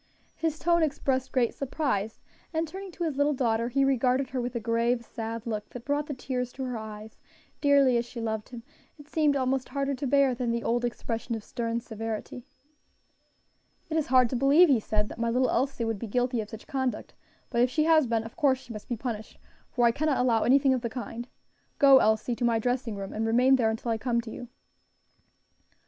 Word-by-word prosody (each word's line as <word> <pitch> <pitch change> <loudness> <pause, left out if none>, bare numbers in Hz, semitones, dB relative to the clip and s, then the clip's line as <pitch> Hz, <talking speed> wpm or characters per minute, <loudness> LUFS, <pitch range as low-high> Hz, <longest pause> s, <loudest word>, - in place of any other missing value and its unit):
His 320 -2 -2
tone 340 +2 +2
expressed 270 -4 0
great 245 -3 +1
surprise, 260 -7 -2 0.3
and 320 0 -1
turning 385 +3 -8
to 345 - -4
his 310 -5 -2
little 290 0 +2
daughter, 235 -2 0
he 275 +2 +2
regarded 260 0 +1
her 255 -1 -1
with 245 0 -4
a - - 0
grave, 235 +1 0
sad 225 0 -6
look 215 -3 -4
that 245 -1 -9
brought 290 +1 -1
the 285 - -4
tears 250 -1 -3
to 265 - -5
her 250 -1 -3
eyes; 215 0 -8 0.4
dearly 280 -4 +5
as 235 - -1
she 240 - -8
loved 220 -2 -3
him, 240 -2 -9 0.3
it 290 -1 -14
seemed 300 -2 +2
almost 260 -1 0
harder 280 0 -1
to 270 +1 -3
bear 275 0 +4
than 245 0 -2
the 235 0 -1
old 240 +1 0
expression 235 -1 -3
of 220 - -6
stern 230 +1 -3
severity. 225 +1 -5 1.5
"It - - -1
is 315 -2 +1
hard 255 -1 +5
to - - -1
believe," 280 +7 +5
he 260 -5 +4
said, 210 0 -1
"that - - -9
my 230 0 0
little 255 +2 +2
Elsie 260 -1 0
would 225 -3 -2
be 230 - -5
guilty 245 +2 0
of 210 - -8
such 220 0 -10
conduct; 260 -2 -3 0.4
but 235 -1 +2
if 245 - +4
she 305 +4 +1
has 315 -3 +4
been, 225 -1 0
of 225 - -10
course 270 -3 +3
she 250 -2 -11
must 215 - -9
be 240 - -2
punished, 220 -2 -5 0.3
for 240 -1 +1
I 235 - +5
cannot 290 +2 0
allow 240 -3 +2
anything 270 +2 +4
of 255 - -1
the 235 - -2
kind. 240 0 -6 0.5
Go. 275 -2 +7
Elsie, 220 +3 +1
to 245 - -3
my 235 -1 +3
dressing 245 -1 -1
room 195 -1 -6
and 220 +1 -1
remain 250 +4 +5
there 235 -4 +2
until 225 +1 -2
I 225 - -1
come 240 0 0
to 225 -1 -9
you." 245 - -8
245 Hz, 220 wpm, -28 LUFS, 230-275 Hz, 1.5 s, Go